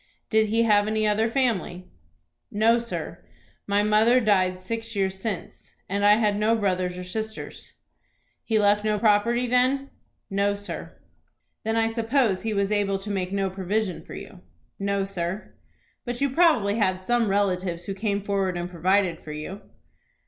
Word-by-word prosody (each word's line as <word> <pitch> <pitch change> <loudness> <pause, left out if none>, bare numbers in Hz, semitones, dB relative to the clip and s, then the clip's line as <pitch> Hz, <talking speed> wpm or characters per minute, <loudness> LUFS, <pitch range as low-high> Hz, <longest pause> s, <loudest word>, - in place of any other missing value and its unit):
"Did 220 -1 +4
he 225 +2 +2
have 210 -2 +3
any 215 0 +1
other 220 +2 +2
family?" 225 -8 -1 0.7
"No, 225 +3 +3
sir; 235 0 -6 0.4
my 205 0 +2
mother 215 +4 +4
died 185 -5 +2
six 225 +4 -5
years 190 -1 -1
since, 205 -3 -6
and 200 +1 -1
I 205 0 +7
had 210 -2 +1
no 220 +2 +3
brothers 185 -4 -1
or 180 - -5
sisters." 220 +4 -6 0.7
"He 225 - +1
left 205 0 +3
no 215 -1 +1
property 225 +3 +2
then?" 255 +3 +1 0.4
"No, 200 +1 +1
sir." 205 +1 -8 0.7
"Then 220 +1 -1
I 225 0 +3
suppose 225 -3 +1
he 220 - -2
was 200 -1 0
able 200 -2 +1
to 200 +2 -6
make 185 -2 -2
no 195 -1 -1
provision 190 0 -2
for - - -10
you?" 180 - -10 0.4
"No, 200 0 0
sir." 190 +1 -4 0.5
"But 240 -1 -4
you 280 -1 +1
probably 260 - +3
had 185 -4 +1
some 235 +4 +1
relatives 185 -3 0
who 195 - -3
came 200 0 -2
forward 195 -3 -1
and 175 0 -3
provided 180 0 +1
for 150 - -8
you?" 170 +7 -7
205 Hz, 165 wpm, -25 LUFS, 190-225 Hz, 0.7 s, I